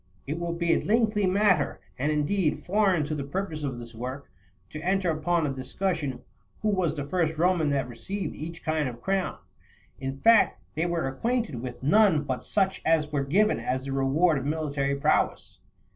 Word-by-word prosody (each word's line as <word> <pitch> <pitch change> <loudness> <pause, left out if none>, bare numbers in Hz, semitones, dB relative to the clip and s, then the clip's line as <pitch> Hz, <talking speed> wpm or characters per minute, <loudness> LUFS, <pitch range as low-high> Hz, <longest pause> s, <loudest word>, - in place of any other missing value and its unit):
It 150 +4 -3
would 170 0 -3
be 170 -1 +2
a - - +1
lengthy 215 -2 +2
matter, 185 -5 +2 0.2
and, 145 +7 0
indeed, 150 +3 0
foreign 190 -5 +2
to 155 - -3
the 145 -2 -3
purpose 160 +1 -4
of 135 -4 -3
this 120 -1 -9
work, 130 +3 -6 0.4
to 155 - -6
enter 185 0 +1
upon 160 +1 0
a 140 - -1
discussion 135 -1 -3 0.4
who 215 - +2
was 180 -6 +1
the 145 -2 -4
first 160 0 0
Roman 170 -2 +2
that 135 -3 0
received 190 - -5
each 165 +2 -7
kind 155 -3 0
of 120 -1 -9
crown; 190 +5 -1 0.6
in 135 0 -4
fact, 225 +8 +5
they 160 +3 0
were 170 -5 -1
acquainted 220 - -1
with 125 0 -7
none 185 -1 +4
but 130 -3 -3
such 195 -2 0
as 155 -2 +2
were 145 -2 0
given 200 +10 +2
as 130 +1 -2
the 135 - -4
reward 140 +4 +2
of 135 - -6
military 145 -3 -1
prowess. 140 - 0
155 Hz, 185 wpm, -27 LUFS, 140-185 Hz, 0.6 s, fact